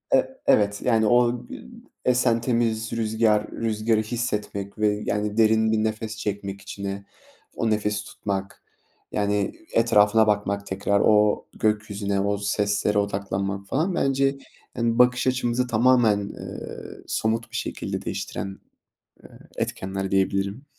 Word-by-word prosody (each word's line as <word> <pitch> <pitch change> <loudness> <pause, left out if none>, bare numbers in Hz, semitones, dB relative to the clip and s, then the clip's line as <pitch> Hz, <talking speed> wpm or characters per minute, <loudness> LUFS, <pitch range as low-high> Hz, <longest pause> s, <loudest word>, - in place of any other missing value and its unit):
E 130 0 0
evet. 100 -1 +3
Yani, 115 -3 +3
o 120 +1 +3
gü - - -10 0.4
esen 120 -2 +3
temiz 115 -2 0
rüzgâr, 110 -1 +1
rüzgârı 110 0 0
hissetmek 105 -3 -3
ve, 105 -1 +1
yani, 105 +1 -1
derin 110 0 +4
bir 110 - +2
nefes 110 0 -3
çekmek 100 -2 -4
içine, 100 0 -6 0.5
o 115 - 0
nefesi 105 -1 0
tutmak, 100 -2 -5 0.5
yani, 100 -1 0 0.2
etrafına 110 -1 +4
bakmak, 100 -1 0
tekrar 100 +1 0
o 105 -1 +4
gökyüzüne, 105 -2 -1
o 100 +1 0
seslere 100 0 0
odaklanmak 100 -1 -2
falan 165 - 0
bence, 135 -1 +1 0.4
yani, 115 -1 +1
bakış 125 +1 +4
açımızı 125 -1 +1
tamamen, 120 -2 +4
ııı, 100 0 -8
somut 115 +1 -1
bir - - -8
şekilde - - -3
değiştiren, 95 0 -5 0.6
eee, - - -14 0.3
etkenler 95 0 -3
diyebilirim. 100 +5 0
105 Hz, 125 wpm, -24 LUFS, 100-115 Hz, 0.6 s, derin